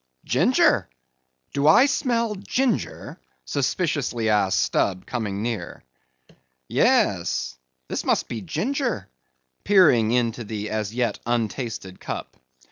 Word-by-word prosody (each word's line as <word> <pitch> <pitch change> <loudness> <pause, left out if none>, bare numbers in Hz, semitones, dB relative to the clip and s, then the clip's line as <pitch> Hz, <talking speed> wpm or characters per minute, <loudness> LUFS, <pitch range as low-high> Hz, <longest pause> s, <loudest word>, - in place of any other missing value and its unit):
"Ginger? - - +3 0.6
Do 140 +1 +1
I 235 - +7
smell 240 -6 0
ginger?" 245 +5 -2 0.3
suspiciously 140 -5 -1
asked 100 -3 +2
Stubb, 95 -2 0
coming 105 -5 -3
near. 115 -2 -4 0.8
"Yes, - - +1 0.3
this - - -3
must - - +1
be 115 -2 -5
ginger," 225 - -2 0.5
peering 155 - +5
into 120 0 0
the 105 -1 -5
as 110 -2 -2
yet 120 -4 0
untasted 115 -4 -3
cup. - - -6
120 Hz, 105 wpm, -24 LUFS, -, 0.8 s, I